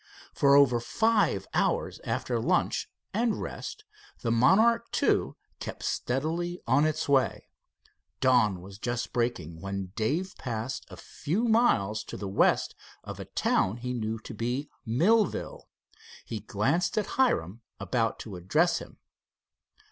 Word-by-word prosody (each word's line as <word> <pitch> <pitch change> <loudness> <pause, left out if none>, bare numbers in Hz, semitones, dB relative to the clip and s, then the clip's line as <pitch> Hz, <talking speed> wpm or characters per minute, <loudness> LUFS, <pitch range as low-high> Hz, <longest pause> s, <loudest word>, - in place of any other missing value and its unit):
For 140 0 +5
over 135 -4 +5
five 220 - +1
hours - - 0
after - - -1
lunch - - 0 0.2
and 230 -2 +1
rest 430 - -6 0.4
the 115 - 0
Monarch 220 - +4 0.2
II - - +2 0.3
kept - - -7
steadily 165 +7 -2
on 135 +5 +4
its 155 0 -2
way. 135 -2 +1 0.7
Dawn 120 -8 +3
was 95 +2 -11
just 120 +1 -3
breaking 90 -10 -2
when 100 -1 -4
Dave 155 - -1
passed 120 +1 -4
a - - -10
few 175 +10 -3
miles 220 - +2
to - - -7
the 100 - -5
west 95 - +2 0.3
of - - -8
a - - -6
town 95 +5 +1
he 125 +1 -4
knew 110 -2 -2
to 110 - -9
be 120 +6 -3 0.2
Millville. 195 - +1 0.6
He 110 - -4
glanced 135 - 0
at 210 - +2 0.2
Hiram, 105 - +1 0.2
about 115 -3 0
to 100 -5 -7
address 150 - +2
him. - - -12
125 Hz, 135 wpm, -28 LUFS, 110-175 Hz, 0.7 s, For